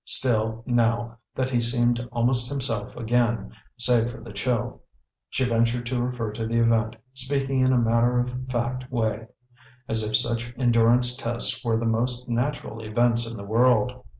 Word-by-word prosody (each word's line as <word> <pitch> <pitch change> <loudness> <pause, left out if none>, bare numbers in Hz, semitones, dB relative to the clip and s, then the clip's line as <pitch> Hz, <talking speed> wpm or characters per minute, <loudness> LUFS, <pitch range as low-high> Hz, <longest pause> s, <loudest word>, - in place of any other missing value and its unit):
Still, 110 -2 +1
now 115 -1 0 0.2
that 130 0 -1
he 120 - +2
seemed 120 0 +2
almost 120 +1 +1
himself 125 -7 -1
again, 115 -3 0 0.3
save 120 -1 +2
for 120 - -9
the 115 - -11
chill, 115 +2 -2 0.5
she 130 - 0
ventured 115 0 +1
to 125 0 -1
refer 120 -3 -2
to 110 +1 -4
the 115 +1 -1
event, 115 -1 +2 0.2
speaking 135 0 -1
in 130 0 +4
a 130 - +3
matter 120 +1 +2
of 125 +1 -3
fact 125 +1 -3
way, 115 -2 -1 0.6
as 115 0 +1
if 110 0 0
such 120 +1 0
endurance 120 0 +4
tests 120 0 -2
were 115 -2 +1
the 115 - -2
most 120 +2 0
natural 120 -1 -2
events 115 +2 +1
in 115 -1 -7
the 100 - -7
world. 125 +3 +2
120 Hz, 165 wpm, -25 LUFS, 115-125 Hz, 0.6 s, in